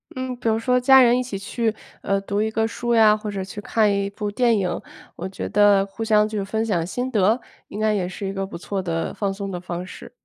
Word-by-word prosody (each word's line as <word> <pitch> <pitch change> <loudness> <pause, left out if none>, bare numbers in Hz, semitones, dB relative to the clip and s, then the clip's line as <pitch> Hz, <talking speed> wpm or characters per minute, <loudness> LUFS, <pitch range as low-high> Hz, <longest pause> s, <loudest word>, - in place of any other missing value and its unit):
嗯， 255 0 -3
比 240 - -4
如 220 0 +3
说 250 +2 +2
家 265 +1 +7
人 245 -1 +5
一 - - +1
起 245 -5 -5
去， 220 +3 -2 0.3
呃， 195 0 0
读 200 +1 -2
一 220 - 0
个 220 0 0
书 235 +1 -1
呀， 215 -2 +6
或 215 0 -5
者 195 -2 -3
去 195 +2 -8
看 210 0 +2
一 200 0 -1
部 205 0 -4
电 235 +1 +2
影， 180 -3 -2 0.4
我 180 - -4
觉 190 - -6
得 205 -1 +4
互 200 +3 -7
相 215 -1 +3
就 215 0 -5
是 200 - -2
分 220 +3 -1
享 175 -7 0
心 250 +7 -3
得， 215 +1 +3 0.3
应 205 - -8
该 215 0 +2
也 190 -4 -1
是 190 +2 -6
一 195 - -2
个 195 0 -3
不 190 - -8
错 195 +2 -4
的 165 -2 -2
放 200 -2 -2
松 195 0 -5
的 180 - -4
方 175 0 -5
式。 - - -11
210 Hz, 280 characters per minute, -22 LUFS, 195-225 Hz, 0.4 s, 家